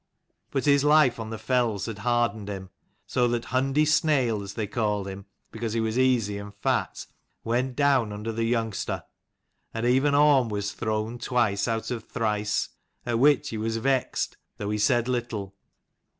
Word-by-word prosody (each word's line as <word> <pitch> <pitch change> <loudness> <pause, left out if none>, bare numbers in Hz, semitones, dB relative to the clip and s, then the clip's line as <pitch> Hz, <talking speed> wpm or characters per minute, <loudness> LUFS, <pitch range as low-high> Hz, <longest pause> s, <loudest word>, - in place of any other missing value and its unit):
But 135 - -1
his 140 -1 +4
life 150 -5 +4
on 110 -1 -5
the 110 - -5
fells 115 -5 0
had 110 -3 -6
hardened 115 -2 0
him, 95 -2 -6 0.3
so 125 -1 +1
that 120 -1 -1
Hundi 135 +4 +2
Snail, 140 -8 +2
as 100 - -8
they 110 - -1
called 105 -2 -1
him 95 0 -8 0.2
because 115 0 -4
he 115 - 0
was 110 0 -1
easy 115 -6 +2
and 100 0 -9
fat, 100 - -1 0.4
went 125 +2 -1
down 135 -6 +3
under 105 +2 -4
the 115 +1 -1
youngster: 115 -3 -1 0.7
and 115 +1 -1
even 135 +4 +3
Orm 145 -5 +5
was 105 -1 -3
thrown 110 +1 -2
twice 115 -5 +1
out 115 +1 -2
of 115 -3 -3
thrice; 105 -3 -1 0.4
at 120 -2 0
which 145 +1 +4
he 110 - -4
was 110 +1 -1
vexed, 130 +2 0 0.2
though 105 0 -3
he 105 - -1
said 120 +3 +2
little. 115 -6 -3
115 Hz, 170 wpm, -26 LUFS, 105-130 Hz, 0.7 s, Orm